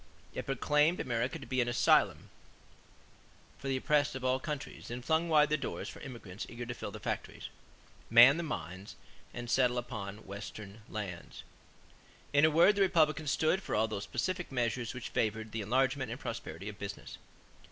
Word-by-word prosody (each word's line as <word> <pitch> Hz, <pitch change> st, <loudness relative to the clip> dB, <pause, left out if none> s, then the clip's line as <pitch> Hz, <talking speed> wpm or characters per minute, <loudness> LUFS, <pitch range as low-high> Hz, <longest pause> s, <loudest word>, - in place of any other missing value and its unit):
It -, -, -5 dB
proclaimed 150 Hz, +5 st, +2 dB
America 120 Hz, +4 st, -1 dB
to 135 Hz, -, -10 dB
be 130 Hz, -1 st, 0 dB
an 120 Hz, -, 0 dB
asylum 120 Hz, 0 st, +3 dB, 1.3 s
for 140 Hz, -, -6 dB
the 135 Hz, -1 st, +1 dB
oppressed 145 Hz, 0 st, +2 dB
of 130 Hz, -1 st, -4 dB
all 130 Hz, +1 st, +2 dB
countries 150 Hz, 0 st, -6 dB
and 120 Hz, +1 st, -6 dB
flung 160 Hz, +1 st, +2 dB
wide 150 Hz, -2 st, +5 dB
the 155 Hz, -, +2 dB
doors -, -, -4 dB
for -, -, -10 dB
immigrants 115 Hz, -8 st, -8 dB
eager 120 Hz, 0 st, -6 dB
to 120 Hz, -, -4 dB
fill 120 Hz, -, -6 dB
the 110 Hz, +1 st, -8 dB
factories, -, -, -4 dB, 0.6 s
man 120 Hz, +6 st, +8 dB
the -, -, -1 dB
mines, 95 Hz, -, -6 dB, 0.4 s
and 120 Hz, 0 st, -6 dB
settle 125 Hz, 0 st, +3 dB
upon 110 Hz, -4 st, -5 dB
Western 100 Hz, +1 st, -8 dB
lands. 95 Hz, -5 st, -6 dB, 0.9 s
In 145 Hz, +1 st, +6 dB
a -, -, +5 dB
word 165 Hz, +6 st, +6 dB
the 200 Hz, -, +1 dB
Republicans 155 Hz, -5 st, +3 dB
stood 160 Hz, +6 st, +2 dB
for -, -, -3 dB
all 110 Hz, +1 st, +3 dB
those 105 Hz, -2 st, -4 dB
specific 185 Hz, -3 st, -2 dB
measures 120 Hz, -1 st, -1 dB
which 130 Hz, -, -5 dB
favored 110 Hz, 0 st, -1 dB
the 110 Hz, -, -3 dB
enlargement 130 Hz, +3 st, +1 dB
and 120 Hz, +4 st, -5 dB
prosperity 110 Hz, -, -6 dB
of 105 Hz, -1 st, -7 dB
business. 100 Hz, 0 st, -7 dB
125 Hz, 175 wpm, -32 LUFS, 110-150 Hz, 1.3 s, man